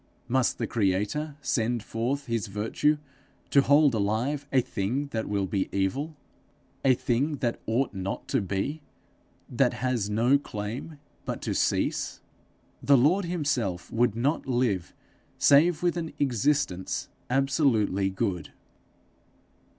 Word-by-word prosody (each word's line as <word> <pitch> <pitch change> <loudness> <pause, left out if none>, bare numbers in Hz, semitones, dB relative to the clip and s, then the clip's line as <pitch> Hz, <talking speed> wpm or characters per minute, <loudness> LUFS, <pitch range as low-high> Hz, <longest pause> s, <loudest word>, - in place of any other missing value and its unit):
Must 130 0 +1
the - - -1
creator 110 +9 -1
send 120 -3 0
forth 125 +6 -2
his 115 -3 -2
virtue 110 +9 +1 0.5
to 140 - +6
hold 145 0 +5
alive 115 +8 -1
a 135 - +4
thing 125 +5 -2
that 110 -3 -3
will 100 -1 0
be 95 0 -1
evil 135 - -1 0.7
a 130 -2 +5
thing 130 +4 0
that 120 -3 -1
ought 120 +3 0
not 95 0 -4
to - - +2
be, 100 - -2 0.7
that - - +2
has 125 -5 -1
no 120 +6 +3
claim 115 +6 -6 0.3
but - - -4
to - - -1
cease? - - 0 0.6
The 140 -1 +5
Lord 170 +10 +3
himself 140 - -2
would 115 -2 +2
not 135 +7 0
live 120 -8 0 0.5
save 155 +4 +5
with 175 -1 +2
an 165 -2 -4
existence 130 -7 0 0.2
absolutely 125 - +2
good. 95 -3 -2
120 Hz, 125 wpm, -27 LUFS, 105-145 Hz, 0.7 s, to